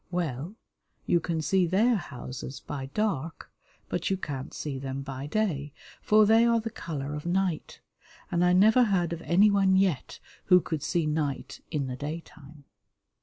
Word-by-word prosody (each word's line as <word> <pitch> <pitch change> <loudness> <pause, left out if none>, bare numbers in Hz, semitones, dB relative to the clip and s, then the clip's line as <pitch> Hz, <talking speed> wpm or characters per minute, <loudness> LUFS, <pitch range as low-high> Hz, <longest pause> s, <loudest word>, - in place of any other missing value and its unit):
Well, 170 - -3 0.5
you 170 - +3
can 165 -1 -2
see 185 +1 +2
their 215 +8 +3
houses 130 - -6
by 135 -2 -6
dark, 165 -2 -3 0.4
but - - -2
you 190 - +1
can't 135 -7 -5
see 140 -3 -5
them 135 0 -4
by 135 0 -6
day, 150 -7 -1 0.3
for 215 0 +5
they 225 +2 +5
are 235 -1 +4
the 225 0 -5
colour 150 -8 -5
of 150 +2 -5
night, 180 -2 -1 0.5
and 175 0 +2
I 180 - +4
never 215 +7 +5
heard 175 -5 +1
of 165 - -6
anyone 195 +2 +4
yet 190 -7 0 0.3
who 180 -1 +7
could 160 -3 -4
see 165 +2 0
night 150 -3 -2
in 145 -3 -1
the 130 -1 -4
daytime. 150 0 -8
170 Hz, 165 wpm, -28 LUFS, 145-195 Hz, 0.5 s, who